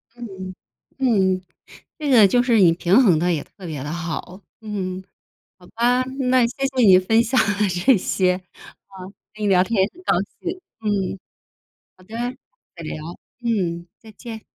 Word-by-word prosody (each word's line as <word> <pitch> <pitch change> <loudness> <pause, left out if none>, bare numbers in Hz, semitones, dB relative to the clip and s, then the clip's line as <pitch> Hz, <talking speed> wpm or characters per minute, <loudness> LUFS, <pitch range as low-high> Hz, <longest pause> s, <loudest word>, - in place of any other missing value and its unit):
嗯， 190 -6 -8 0.4
嗯。 190 -8 +2 0.6
这 295 -2 -2
个 225 -6 +7
就 245 +5 +3
是 235 -3 +3
你 175 -4 +6
平 180 +8 +3
衡 175 -9 +4
得 175 +1 +1
也 150 - -1
特 190 -3 -13
别 150 -5 -5
地 145 - -5
好， 175 +2 -5 0.2
嗯。 190 -4 -4 0.6
好 180 -1 -18
吧， 245 +2 +1 0.3
那 255 -2 +4
谢 270 +3 -3
谢 265 -2 -1
你 185 -1 +8
分 225 +5 +3
享 255 +3 -1 0.2
的 210 - +3
这 190 +7 +3
些， 180 0 +1 0.5
啊， 190 -2 -11 0.3
跟 215 0 -7
你 - - +1
聊 185 -2 +4
天 195 +1 +1
也 195 - +2
很 360 - -16
高 - - +2 0.3
兴， 360 +1 -4 0.2
嗯。 200 -3 -1 0.8
好 185 - -19
的， 220 +5 -11 0.6
再 170 - -9
聊， 155 - -5 0.5
嗯， 175 -7 -1
再 220 -1 -14
见， 225 -1 -9
195 Hz, 180 characters per minute, -21 LUFS, 185-235 Hz, 0.8 s, 你